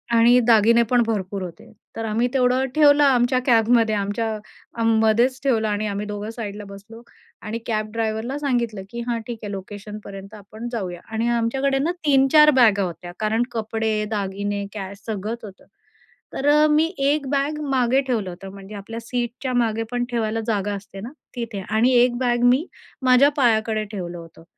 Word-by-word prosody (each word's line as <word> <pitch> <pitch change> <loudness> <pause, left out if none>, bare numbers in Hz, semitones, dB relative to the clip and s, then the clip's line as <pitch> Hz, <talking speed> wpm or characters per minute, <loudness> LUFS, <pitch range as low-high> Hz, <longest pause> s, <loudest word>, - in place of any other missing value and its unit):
आणि 235 +2 +6
दागिने 230 +1 +5
पण 240 +1 +2
भरपूर 200 -3 -2
होते. 175 -2 -10 0.2
तर 225 - -4
आम्ही 225 +3 0
तेवढं 255 0 +2
ठेवलं 295 -1 +6
आमच्या 255 -2 +3
कॅबमध्ये 230 -2 +3
आमच्या 205 +3 -2 0.5
अ, 230 - -1
मध्येच 225 +3 +3
ठेवलं 230 -5 +1
आणि 210 0 -1
आम्ही 205 0 -3
दोघं 210 0 -5
साईडला 210 -3 -6
बसलो. 205 +4 -12 0.4
आणि 225 +1 -5
कॅब 215 -2 -2
ड्रायव्हरला 225 +3 -2
सांगितलं 240 -8 -1
की 235 - -7
हां, 235 -1 -1
ठीक 235 -2 -6
आहे 205 - -5
लोकेशनपर्यंत 200 0 -8
आपण 215 +3 -9
जाऊया. 185 -6 -4
आणि 225 +1 -1
आमच्याकडे 270 +4 0
ना 310 +5 0
3-4 290 +2 +6
बॅगा 210 -5 +5
होत्या, 175 -1 -6
कारण 220 +2 +1
कपडे, 220 -1 -2 0.2
दागिने, 200 0 -2
कॅश 200 -1 -7
सगळंच 220 +2 -4
होतं. 195 -3 -12 0.7
तर 275 - -2
अ, 300 +1 +5
मी 305 +2 +4
एक 280 +1 +1
बॅग 285 +2 -1
मागे 260 0 +2
ठेवलं 220 -7 -1
होतं, 180 +2 -9
म्हणजे 200 +1 -10
आपल्या 215 +3 -7
सीटच्यामागे 240 -1 -1
पण 245 0 -1
ठेवायला 225 -1 -1
जागा 205 -2 -1
असते 195 0 -10
ना, 235 +5 -7 0.2
तिथे. 230 -5 -5
आणि 225 +4 +3
एक 240 0 +4
बॅग 240 -1 0
मी 255 +6 +4 0.4
माझ्या 255 +2 +6
पायाकडे 220 -4 +2
ठेवलं 175 -4 -5
होतं. 165 -1 -13
225 Hz, 165 wpm, -22 LUFS, 205-245 Hz, 0.7 s, आणि